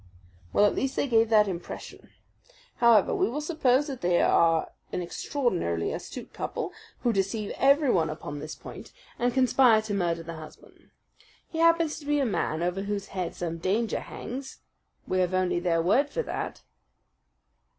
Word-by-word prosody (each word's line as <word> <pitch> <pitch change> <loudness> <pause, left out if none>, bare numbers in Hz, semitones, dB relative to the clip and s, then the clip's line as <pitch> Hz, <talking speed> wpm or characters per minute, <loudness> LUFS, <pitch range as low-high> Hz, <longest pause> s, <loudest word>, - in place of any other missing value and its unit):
"Well 205 - +4
at 205 - +3
least 265 0 -2
they - - 0
gave 225 -2 +3
that 210 -2 +5
impression. 180 -3 -7 0.7
However, 235 -5 +5
we - - +1
will 275 +5 -3
suppose 295 -4 +2
that 270 -4 -6
they 175 0 +2
are 165 -1 +3 0.2
an 180 - -2
extraordinarily 175 - -1
astute - - -8
couple, - - -4 0.3
who 240 - +1
deceive 200 +2 -1
everyone 270 - +3
upon 145 -1 -6
this 155 +1 -7
point, - - -11 0.3
and 245 +1 +2
conspire 255 -3 +5
to 215 -1 -4
murder 170 -4 0
the 165 +1 -7
husband. 155 -1 -14 0.6
He 325 - -4
happens 330 -1 +3
to 290 - -12
be 295 0 +2
a 280 - +2
man 170 -7 -1
over 180 +2 -1
whose 200 0 -4
head 185 -3 -4
some 165 -1 -4
danger 210 +6 0
hangs 265 +2 -8 0.2
" - - -42
"We 185 - 0
have 185 0 +1
only 180 -1 +1
their 170 -2 +1
word 270 - +3
for 480 - -2
that." - - -5
205 Hz, 170 wpm, -27 LUFS, 175-265 Hz, 0.7 s, that